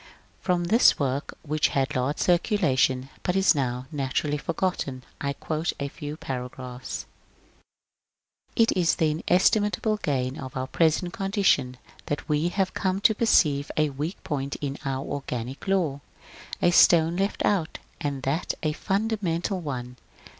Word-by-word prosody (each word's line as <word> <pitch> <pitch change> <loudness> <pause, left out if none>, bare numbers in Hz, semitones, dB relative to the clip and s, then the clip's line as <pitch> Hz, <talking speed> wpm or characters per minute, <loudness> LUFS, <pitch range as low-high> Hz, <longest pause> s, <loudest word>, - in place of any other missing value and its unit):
From 180 -2 0
this 220 +8 +5
work, 140 0 -2
which 155 0 +1
had 135 +3 0
large 130 +4 0
circulation 150 - +2
but 180 - -1
is 190 -1 +5
now 130 -3 -2
naturally 145 +1 -1
forgotten, 155 -6 -2 0.2
I 140 0 -1
quote 155 +3 -2
a 140 0 -2
few 145 +2 -7
paragraphs: 125 -1 -6 0.7
— - - -62 0.7
It 230 -2 +4
is 175 -3 +3
the 155 -2 +2
inestimable 205 +6 +2
gain 135 -6 -2
of 130 -1 -7
our 130 - -1
present 165 +5 +1
condition, 195 - +1 0.3
that 145 - -3
we 150 +1 +1
have 190 0 -1
come 190 0 0
to 220 - +5
perceive 150 -11 +3
a 155 -1 +2
weak 150 +7 -4
point 140 -2 -3
in 140 -1 -4
our 135 0 -2
organic 130 +1 -5
law, 170 -8 +1 0.3
— - - -12
a 175 - +5
stone 170 -1 +6
left 195 +2 0
out, 175 -7 0 0.2
and 140 -2 -3
that 145 +6 -1
a 155 - +2
fundamental 195 -2 -1
one. 125 -6 -5
150 Hz, 145 wpm, -26 LUFS, 135-180 Hz, 0.7 s, stone